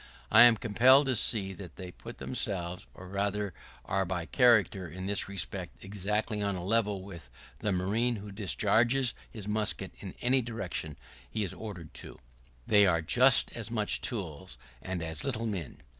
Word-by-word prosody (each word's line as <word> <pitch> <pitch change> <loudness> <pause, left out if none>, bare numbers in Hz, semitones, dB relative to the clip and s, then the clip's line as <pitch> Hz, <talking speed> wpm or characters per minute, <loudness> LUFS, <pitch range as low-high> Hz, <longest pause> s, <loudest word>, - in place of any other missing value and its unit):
I - - +8
am 120 -2 +6
compelled 125 +5 +5
to 130 -2 +2
see 100 -3 +3
that 95 -2 -10
they 90 -2 -8
put 115 +6 -11
themselves, 90 -7 -3
or 95 - -11
rather 100 0 -2 0.3
are 95 +6 0
by 90 -2 -3
character, 110 -6 +3
in 95 +4 -7
this 100 0 0
respect, 95 -1 -4
exactly 105 +2 -2
on 100 -1 0
a 90 -1 -5
level 105 -2 +1
with 85 -9 -10 0.3
the 105 - -1
marine 105 +7 +1
who 105 -1 -8
discharges 115 +5 +2 0.2
his 105 -3 -8
musket 105 0 -1
in - - -8
any 130 +2 +2
direction 95 - -5 0.3
he 105 - -2
is 95 - -3
ordered 90 -8 -8
to. - - -10 0.5
They 105 -1 +5
are 85 -3 +2
just 125 +9 +4
as 115 -2 -5
much 110 -3 0
tools, 95 - -5 0.2
and 90 +2 -4
as 80 -2 -3
little 115 -4 -2
men. 95 - -5
100 Hz, 170 wpm, -30 LUFS, 95-115 Hz, 0.5 s, I